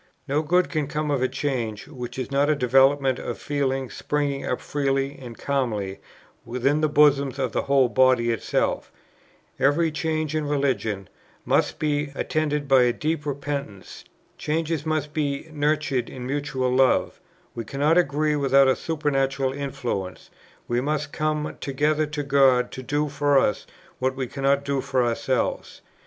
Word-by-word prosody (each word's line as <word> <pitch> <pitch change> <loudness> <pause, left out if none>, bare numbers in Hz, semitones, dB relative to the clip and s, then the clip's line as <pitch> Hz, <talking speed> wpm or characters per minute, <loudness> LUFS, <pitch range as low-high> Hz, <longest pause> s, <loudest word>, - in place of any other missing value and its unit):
No 145 +2 +1
good 180 +4 +2
can 155 -4 -1
come 150 +1 -2
of 140 -3 0
a 130 - +3
change 130 -6 -3
which 125 -4 -7
is 130 +1 -4
not 140 +2 +2
a 155 - +3
development 135 +1 +3
of - - -5
feelings 135 -3 -2
springing 145 -2 -2
up 125 - -2
freely 135 -1 -1
and 120 -3 -9
calmly 110 -9 -2 0.4
within 130 +5 0
the 155 - +2
bosom 140 -2 +4
of 130 -3 -1
the - - 0
whole 135 -2 +3
body 125 -2 +3
itself; 115 - -1 0.7
every 155 +4 +3
change 155 0 -2
in 155 -2 -1
religion" 115 -9 -1 0.4
must - - +1
be 150 -2 0
"attended 150 -2 -1
by 130 -3 +5
deep 150 +3 -2
repentance; 140 -7 -5 0.4
changes" 160 0 -2
must 155 -1 -1
be 145 -1 -2
"nurtured 145 -4 0
in 125 -1 -7
mutual 135 -2 -1
love; 130 0 +2 0.3
we 115 - -5
cannot 145 +7 +1
agree 150 -2 +2
without 140 -1 +4
a 130 - +4
supernatural 135 -4 -1
influence;" 125 -9 -4 0.4
we 120 +1 0
must 145 +1 -2
come 155 0 -2
"together 150 +3 0
to 150 -1 -4
God 135 -3 +3
to 130 - -7
do 145 +3 -1
for 145 0 +2
us 105 - +1 0.3
what 130 +1 0
we 130 -1 -2
cannot 140 +2 0
do 140 -1 0
for 130 -2 0
ourselves." 120 +2 -2
140 Hz, 155 wpm, -24 LUFS, 130-150 Hz, 0.7 s, by